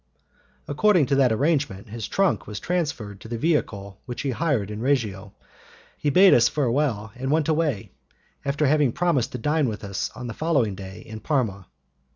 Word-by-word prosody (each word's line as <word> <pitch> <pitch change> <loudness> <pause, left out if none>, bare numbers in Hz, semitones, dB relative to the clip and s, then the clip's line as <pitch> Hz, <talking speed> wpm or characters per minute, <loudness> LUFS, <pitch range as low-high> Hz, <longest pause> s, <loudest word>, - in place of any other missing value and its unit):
According 175 +2 +3
to 140 - +1
that 130 -3 +4
arrangement 125 - 0
his 110 0 -5
trunk 195 -2 +1
was 105 -1 -5
transferred 145 - -3
to - - -10
the 115 +1 -4
vehicle 100 - -1
which 120 +1 -5
he 135 - 0
hired 125 - 0
in 105 +1 -5
Reggio, 105 -7 -1 0.6
he 145 - -1
bade 185 +7 +7
us 120 - +5
farewell 125 -6 0
and 130 +1 -4
went 155 0 +2
away, 155 -9 0 0.5
after 140 +2 0
having 145 -3 +3
promised 170 -9 +1
to - - -2
dine 150 +2 +1
with 110 -1 -6
us 100 -1 -3
on 125 - -7
the 120 - -5
following 140 -10 +1
day 95 0 -9
in 110 0 -9
Parma. 110 - -1
130 Hz, 180 wpm, -24 LUFS, 105-150 Hz, 0.6 s, bade